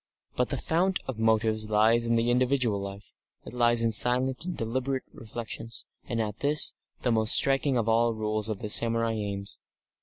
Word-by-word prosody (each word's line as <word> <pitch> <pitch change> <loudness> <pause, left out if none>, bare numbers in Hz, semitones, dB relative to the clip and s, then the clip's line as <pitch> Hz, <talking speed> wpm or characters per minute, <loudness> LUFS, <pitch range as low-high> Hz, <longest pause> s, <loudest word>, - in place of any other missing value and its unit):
But 125 - 0
the 140 - -2
fount 180 +8 0
of 130 -4 -6
motives 110 -1 +1
lies 110 +2 +3
in 115 - +2
the 115 +1 +1
individual 125 -4 +1
life, 100 +1 -9 0.3
it - - -10
lies 120 -1 +3
in 115 - +2
silent 125 +6 +2
and 180 - -5
deliberate 130 +3 -2
reflections, 115 0 -7 0.2
and 115 - -3
at 105 -1 -3
this, 145 +2 +1 0.3
the 125 - +1
most 110 -1 +3
striking 135 -1 +3
of 115 -2 -1
all 115 +1 +3
the 115 - -2
rules 110 0 -2
of 105 -3 -4
the 105 - -3
samurai 115 +1 +3
aims. 100 -2 -5
115 Hz, 185 wpm, -27 LUFS, 110-125 Hz, 0.3 s, lies